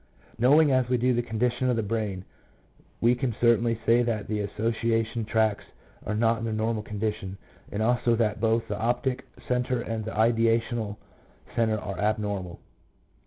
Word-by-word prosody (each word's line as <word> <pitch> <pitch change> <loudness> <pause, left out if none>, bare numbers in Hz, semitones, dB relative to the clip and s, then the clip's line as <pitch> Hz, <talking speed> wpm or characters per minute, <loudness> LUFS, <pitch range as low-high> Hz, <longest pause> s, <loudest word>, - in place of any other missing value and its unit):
Knowing 145 +5 +5
as 130 -2 +2
we 125 - +2
do 125 +2 +2
the 120 - +1
condition 120 +2 -1
of 125 - +2
the 115 - 0
brain, 105 -3 -3 0.8
we 120 +1 +5
can 125 -2 -2
certainly 115 -1 +3
say 115 +1 +5
that 115 -4 -1
the 105 -1 -2
association 115 +2 -1
tracts 110 -1 +1 0.4
are 105 - -1
not 115 +1 +2
in - - -6
their 110 - -2
normal 110 0 -1
condition, 105 -2 -4 0.3
and 105 +2 -1
also 120 0 +2
that 110 -2 0
both 115 0 +1
the 105 - -4
optic 125 +3 -1 0.2
centre 125 0 0
and 115 -1 -3
the 110 - -5
ideational 115 -1 +1 0.6
centre 110 -2 +2
are 100 -1 -6
abnormal. 105 -4 -2
115 Hz, 165 wpm, -27 LUFS, 105-120 Hz, 0.8 s, Knowing